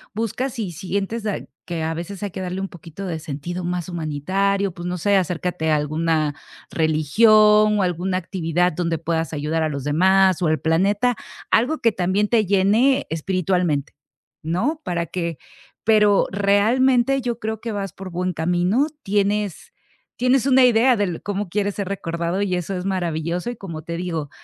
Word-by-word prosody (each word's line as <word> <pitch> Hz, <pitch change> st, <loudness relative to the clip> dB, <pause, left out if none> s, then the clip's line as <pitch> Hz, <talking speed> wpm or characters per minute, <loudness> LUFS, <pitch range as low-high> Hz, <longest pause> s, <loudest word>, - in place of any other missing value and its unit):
busca 230 Hz, +4 st, -2 dB
sí 225 Hz, -8 st, -4 dB
sientes 195 Hz, +6 st, -3 dB
da 210 Hz, -2 st, -1 dB, 0.3 s
que 165 Hz, -2 st, -3 dB
a 160 Hz, -, -1 dB
veces 180 Hz, +4 st, -6 dB
hay 200 Hz, -, -3 dB
que 190 Hz, -, -6 dB
darle 185 Hz, +1 st, -4 dB
un 195 Hz, -, -2 dB
poquito 170 Hz, +2 st, -9 dB
de 165 Hz, -4 st, -3 dB
sentido 160 Hz, +4 st, -5 dB
más 175 Hz, 0 st, -3 dB
humanitario, 185 Hz, +4 st, -1 dB
pues, 175 Hz, -1 st, -6 dB
no 180 Hz, 0 st, -2 dB
sé, 200 Hz, +4 st, +2 dB
acércate 180 Hz, -2 st, -1 dB
a -, -, +4 dB
alguna 155 Hz, 0 st, 0 dB, 0.4 s
religión 210 Hz, +7 st, +4 dB
o 195 Hz, -, +2 dB
alguna 180 Hz, +1 st, -1 dB
actividad 175 Hz, -1 st, 0 dB
donde 165 Hz, -1 st, -1 dB
puedas 165 Hz, 0 st, -2 dB
ayudar 155 Hz, +2 st, -1 dB
a 155 Hz, -, +1 dB
los 140 Hz, -3 st, -4 dB
demás 185 Hz, +4 st, +3 dB
o 170 Hz, -, +2 dB
al 155 Hz, 0 st, +1 dB
planeta, 200 Hz, +9 st, +2 dB, 0.4 s
algo 255 Hz, +8 st, +3 dB
que 230 Hz, -, +3 dB
también 195 Hz, +2 st, 0 dB
te 225 Hz, -3 st, +3 dB
llene 215 Hz, +8 st, +3 dB
espiritualmente, 175 Hz, -3 st, 0 dB, 0.5 s
¿no?, 225 Hz, -, -1 dB
para 170 Hz, -4 st, -2 dB
que 170 Hz, -2 st, -4 dB, 0.5 s
pero 210 Hz, -2 st, +4 dB
realmente 240 Hz, +7 st, +3 dB
yo 240 Hz, -1 st, -3 dB
creo 220 Hz, -1 st, -3 dB
que 230 Hz, -, -4 dB
vas 195 Hz, -3 st, -4 dB
por 185 Hz, +1 st, -9 dB
buen 180 Hz, +1 st, -2 dB
camino. 180 Hz, -, +1 dB, 0.2 s
Tienes 205 Hz, -, -1 dB, 0.5 s
tienes 250 Hz, +1 st, +2 dB
una 265 Hz, -1 st, +5 dB
idea 245 Hz, +1 st, +4 dB
del 195 Hz, -6 st, -2 dB
cómo 205 Hz, -2 st, -3 dB
quieres 205 Hz, +1 st, -1 dB
ser 200 Hz, -2 st, -3 dB
recordado 170 Hz, 0 st, -2 dB
y 190 Hz, -2 st, -1 dB
eso 180 Hz, +2 st, -3 dB
es 180 Hz, -, -5 dB
maravilloso 175 Hz, +1 st, -2 dB
y 245 Hz, -, -5 dB
como 165 Hz, -6 st, -7 dB
te 170 Hz, 0 st, -5 dB
digo, 165 Hz, -5 st, -3 dB
185 Hz, 170 wpm, -22 LUFS, 165-210 Hz, 0.5 s, una